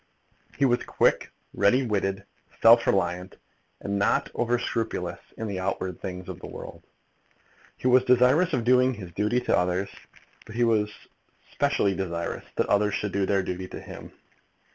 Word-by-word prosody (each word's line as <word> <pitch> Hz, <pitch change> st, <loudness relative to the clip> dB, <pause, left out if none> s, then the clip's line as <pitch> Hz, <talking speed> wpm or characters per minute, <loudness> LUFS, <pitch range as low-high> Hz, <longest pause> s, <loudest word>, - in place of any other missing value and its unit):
He 140 Hz, -, +3 dB
was 120 Hz, -2 st, +2 dB
quick, -, -, +1 dB, 0.2 s
ready 125 Hz, +6 st, +3 dB
witted, 100 Hz, -3 st, -1 dB, 0.3 s
self -, -, +6 dB
reliant, 90 Hz, +2 st, 0 dB, 0.4 s
and 100 Hz, 0 st, -2 dB
not 100 Hz, -, +1 dB
over 120 Hz, 0 st, +1 dB
scrupulous 110 Hz, -7 st, -3 dB, 0.2 s
in 115 Hz, -, -4 dB
the 100 Hz, -3 st, -4 dB
outward 95 Hz, -1 st, -3 dB
things 90 Hz, -1 st, -6 dB
of -, -, -7 dB
the -, -, -9 dB
world. -, -, -9 dB, 1.0 s
He -, -, -13 dB
was 125 Hz, 0 st, +5 dB
desirous 130 Hz, +8 st, +4 dB
of 125 Hz, -6 st, 0 dB
doing 125 Hz, +1 st, +4 dB
his 95 Hz, -5 st, -9 dB
duty 105 Hz, +7 st, 0 dB
to -, -, +1 dB
others, 90 Hz, +2 st, 0 dB, 0.6 s
but 110 Hz, -, -10 dB
he 120 Hz, -, +2 dB
was 110 Hz, -3 st, +2 dB, 0.6 s
specially 100 Hz, -, +1 dB
desirous 85 Hz, -3 st, -4 dB
that -, -, +1 dB
others 100 Hz, 0 st, +2 dB
should 105 Hz, -1 st, -2 dB
do 100 Hz, 0 st, 0 dB
their 100 Hz, -1 st, +1 dB
duty 90 Hz, 0 st, -4 dB
to -, -, -8 dB
him. -, -, -10 dB
100 Hz, 165 wpm, -26 LUFS, 95-120 Hz, 1.0 s, self